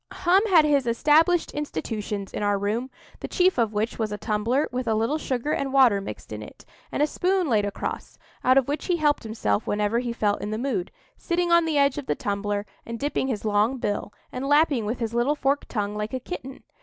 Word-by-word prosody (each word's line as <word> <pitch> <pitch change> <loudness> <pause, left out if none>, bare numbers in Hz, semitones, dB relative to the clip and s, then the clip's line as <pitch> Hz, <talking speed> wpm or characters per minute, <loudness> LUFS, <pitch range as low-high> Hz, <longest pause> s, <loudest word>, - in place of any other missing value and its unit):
Hum 370 +2 +3
had 340 -6 +6
his 285 -4 +2
established 310 +8 +3
institutions 210 - -4
in - - -3
our 205 -1 +2
room, 215 +6 -2 0.3
the - - -5
chief 365 -6 +2
of 225 -2 +2
which 220 +3 -2
was 220 -2 -1
a 210 - -3
tumbler 220 +8 0
with 250 0 -3
a 220 - +2
little 230 +8 0
sugar 265 +1 -2
and 275 -2 -1
water 255 -7 +5
mixed 195 - -8
in - - -6
it, - - -12 0.3
and 290 - +1
a - - +5
spoon 365 +3 0
laid 215 -5 +2
across, 205 - -5 0.3
out 255 +1 +5
of 270 - +3
which 290 +2 -3
he 360 - +2
helped 295 -2 +2
himself 215 - -1
whenever 210 +2 +1
he 245 -1 -3
felt 210 -3 0
in 205 - -4
the 215 - -2
mood—sitting 275 - -3
on 340 -1 +5
the 315 -2 0
edge 280 0 +3
of 280 - -9
the - - +1
tumbler, 205 0 -2 0.2
and 230 0 -6
dipping 280 0 -1
his 225 -5 -3
long 215 +5 +2
bill, 205 -3 -2 0.2
and 255 +2 -4
lapping 290 -6 +3
with 235 +3 -2
his 230 -1 -3
little 240 +5 +2
forked 280 0 0
tongue 205 -3 -2
like 210 +4 -3
a - - -2
kitten. 270 -2 -8
245 Hz, 220 wpm, -25 LUFS, 210-290 Hz, 0.3 s, had